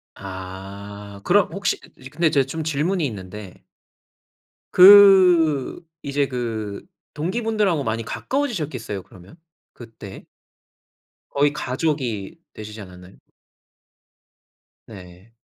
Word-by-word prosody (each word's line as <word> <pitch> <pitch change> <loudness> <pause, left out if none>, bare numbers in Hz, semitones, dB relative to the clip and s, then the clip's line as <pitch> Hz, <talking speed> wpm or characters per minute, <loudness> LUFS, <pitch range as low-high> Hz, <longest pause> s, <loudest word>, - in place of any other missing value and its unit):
아. 100 +2 -9
그럼 200 +1 +3
혹시 195 -3 -1 0.3
근데 165 +1 +1
제가 135 -2 +2
좀 160 +3 -5
질문이 160 +4 -1
있는데. 100 -4 -8 1.1
그 180 -6 +6 0.2
이제 140 0 0
그 115 -3 -5 0.3
동기분들하고 195 -1 -1
많이 115 -1 -2
가까워지셨겠어요 150 - -3
그러면 95 - -17 0.4
그때? - - -12 1.0
거의 145 +1 +1
가족이 130 -6 -3 0.2
되시지 105 0 -9
않았나요? 90 0 -13 1.7
네. 95 +1 -14
130 Hz, 210 characters per minute, -22 LUFS, 100-165 Hz, 1.7 s, 그